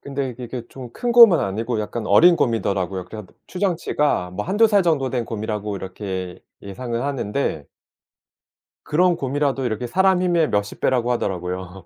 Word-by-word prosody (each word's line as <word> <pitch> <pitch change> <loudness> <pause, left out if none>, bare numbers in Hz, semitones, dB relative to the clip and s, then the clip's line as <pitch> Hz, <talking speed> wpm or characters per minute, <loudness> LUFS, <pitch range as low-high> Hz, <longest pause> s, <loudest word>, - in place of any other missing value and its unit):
근데 140 -1 -4
이게 125 +1 -10
이렇게 120 0 -6
좀 130 -3 -10
큰 245 - -3
곰은 230 -8 +8
아니고 110 +4 -2
약간 110 +1 -5
어린 170 - +6
곰이더라고요. 95 - -1
그렇긴 110 +4 -9
한데 95 - -16
추정치가 165 - -1
뭐 105 +3 -5
1-2 210 +4 +3
살 205 -3 +3
정도 155 -6 +1
된 120 -2 -2
곰이라고 105 -2 -4
이렇게 95 -1 -6 0.2
예상은 115 +4 -5
하는데 135 - -2 1.2
그런 175 +3 +2
곰이라도 135 -1 -1
이렇게 120 +1 -3
사람 190 +6 +2
힘의 170 -4 +2
몇십 105 0 -2
배라고 125 -2 +1
하더라고요. 90 -4 -4
120 Hz, 375 characters per minute, -21 LUFS, 100-150 Hz, 1.2 s, 곰은